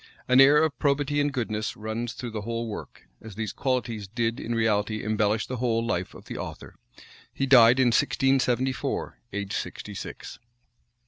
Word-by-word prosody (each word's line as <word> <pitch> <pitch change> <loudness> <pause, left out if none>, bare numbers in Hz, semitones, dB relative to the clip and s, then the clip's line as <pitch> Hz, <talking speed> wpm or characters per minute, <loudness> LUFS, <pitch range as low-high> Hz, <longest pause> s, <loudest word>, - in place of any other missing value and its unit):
An 125 +1 +6
air 140 +2 +7
of 160 -3 -1
probity 145 0 +1
and 145 0 +1
goodness 110 -5 -3
runs 110 +2 -4
through 125 -2 -6
the 110 -1 -4
whole 115 +2 -3
work; 105 - -8
as 110 -3 -10
these 110 -2 -4
qualities 120 -6 -2
did 115 +2 -1
in 120 - -3
reality 110 -1 0
embellish 110 0 +1
the 130 - -5
whole 115 -1 0
life 90 -6 -2
of - - -13
the - - -7
author. - - -7 0.6
He 135 - -1
died 125 -2 +7
in 130 -2 +5
1674, 135 0 +1
aged 100 0 -4
sixty - - -5
six. - - -8
115 Hz, 170 wpm, -26 LUFS, 110-130 Hz, 0.6 s, air